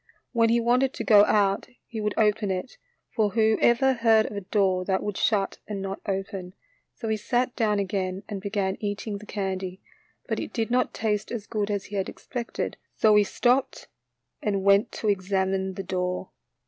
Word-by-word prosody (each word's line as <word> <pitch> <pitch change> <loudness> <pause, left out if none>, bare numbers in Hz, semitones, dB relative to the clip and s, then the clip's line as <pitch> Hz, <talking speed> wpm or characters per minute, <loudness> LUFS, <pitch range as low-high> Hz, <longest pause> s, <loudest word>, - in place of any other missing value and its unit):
When 230 -2 +3
he 235 +1 +4
wanted 250 +3 +2
to - - -3
go 210 -2 +7
out 200 -1 +2 0.2
he 225 -2 -6
would 210 -1 -1
open 210 -1 +2
it, 190 +6 -4 0.3
for 215 -3 +1
who 220 -1 +3
ever 265 +3 +4
heard 225 -3 +4
of - - -6
a 200 - -3
door 190 -1 +1
that 190 0 0
would 205 -2 -3
shut 200 -1 +1
and 205 -2 -4
not 195 0 -5
open, 195 -1 -4 0.4
so 225 - -6
he 220 0 +1
sat 245 +3 0
down 210 -2 +1
again 190 -1 -2
and 200 -2 -5
began 200 -1 -1
eating 205 0 -3
the 210 - -13
candy, 190 -2 -3 0.5
but - - -1
it - - -6
did 230 -1 -1
not 250 0 +1
taste 215 -1 -1
as 230 -4 -4
good 210 -2 -2
as 200 -2 -2
he 205 - -5
had 190 - -1
expected, 240 -2 -5 0.2
so 215 -1 +4
he 210 0 +6
stopped 250 +6 0 0.5
and 200 -2 -1
went 200 +2 +4
to 220 - -3
examine 190 -1 0
the 195 - -4
door. 180 0 -2
205 Hz, 190 wpm, -26 LUFS, 195-225 Hz, 0.5 s, go